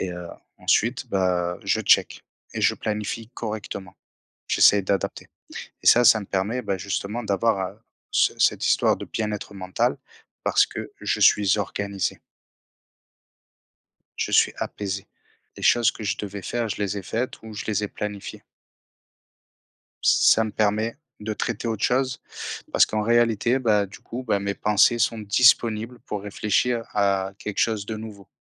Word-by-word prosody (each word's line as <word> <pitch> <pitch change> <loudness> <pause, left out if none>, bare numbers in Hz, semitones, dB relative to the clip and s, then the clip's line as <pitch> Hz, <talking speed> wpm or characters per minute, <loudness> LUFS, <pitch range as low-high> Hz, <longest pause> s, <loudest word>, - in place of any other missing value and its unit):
et 95 - -2
heu, 90 -1 -7 0.4
ensuite 120 +4 +2
bah 90 -3 0
je - - +1
check - - +3 0.3
et - - -3
je - - +3
planifie 105 +1 -4
correctement. 105 -4 -6 0.5
J'essaie 100 -1 +5
d'adapter 100 -2 -2 0.6
et - - -9
ça 120 0 +3
ça 110 -1 +7
me 100 - -8
permet, 110 +7 -1
ben 100 -3 -2
justement 100 +4 -3
d'avoir 110 +2 +2
à 105 +4 -12 0.3
ce - - +2
cette - - +2
histoire - - +3
de - - -7
bien-être 105 -2 -3
mental, 95 -1 0 0.5
parce - - +4
que - - -6 0.2
je - - -1
suis 100 -2 +5
organisé 100 0 -3 2.0
je - - -2
suis - - +4
apaisé. 100 -1 -4 0.5
Les - - -10
choses 120 -2 +4
que 110 - -10
je 100 - -1
devais 100 -1 -6
faire, 120 +3 -2
je 105 - -3
les 100 0 -2
ai - - -6
faites 115 +7 -3
ou 110 -1 -10
je 105 - -5
les 105 -1 0
ai - - -3
planifiées 105 -1 -6 1.6
ça 110 - +5
me 110 - -4
permet 110 +3 0 0.2
de 110 +1 -3
traiter 115 - -3
autre 110 -2 -3
chose, 125 0 +1 0.5
parce - - +5
qu'en 110 0 -2
réalité, 115 +2 +2
bah 105 -5 +2
du 95 - -13
coup 120 +2 -7
bah 110 -5 0
mes 100 0 -2
pensées 105 +3 +3
sont 115 - +1
disponibles 115 +2 +3
pour 105 -2 -4
réfléchir 110 +3 0
à 100 -1 +1
quelque 105 - -6
chose 110 -3 +1
de 110 0 -4
nouveau. 105 -3 -10
105 Hz, 160 wpm, -24 LUFS, 100-115 Hz, 2.0 s, ça